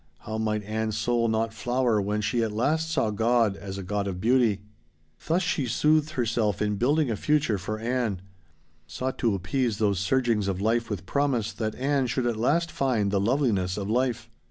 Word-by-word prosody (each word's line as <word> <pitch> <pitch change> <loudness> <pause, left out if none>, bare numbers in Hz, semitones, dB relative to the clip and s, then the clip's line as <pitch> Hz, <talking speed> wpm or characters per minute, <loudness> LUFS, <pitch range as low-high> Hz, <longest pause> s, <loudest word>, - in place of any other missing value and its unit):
How 110 0 -4
might 105 -1 -1
Ann's 110 +1 -2
soul 115 +1 +1
not 110 0 0
flower 120 0 +1
when 105 +2 -1
she 115 +3 0
at 110 -2 0
last 155 +9 0
saw 115 -9 +1
God 115 -1 +2
as 95 -1 -7
a 100 - -5
God 100 +2 -2
of 90 -2 -4
beauty? 115 -2 +2 0.7
Thus 175 +4 +2
she 150 -6 0
soothed 155 +5 +2
herself 115 -4 0
in 105 -1 0
building 140 +3 +2
a - - 0
future 145 -3 +1
for 105 +3 -4
Ann. 115 -3 -1 0.7
Sought 130 +1 -4
to 115 -5 +2
appease 110 +4 -1
those 100 -4 +1
surgings 110 0 +1
of 95 -2 -1
life 115 +3 0
with 95 -4 -4
promise 135 -2 0
that 110 -1 -3
Ann 135 0 0
should 125 +1 -1
at 120 -1 0
last 160 +9 +1
find 125 -10 0
the 100 - +2
loveliness 105 -6 +1
of 100 0 -3
life. 125 -1 0
115 Hz, 190 wpm, -26 LUFS, 105-130 Hz, 0.7 s, God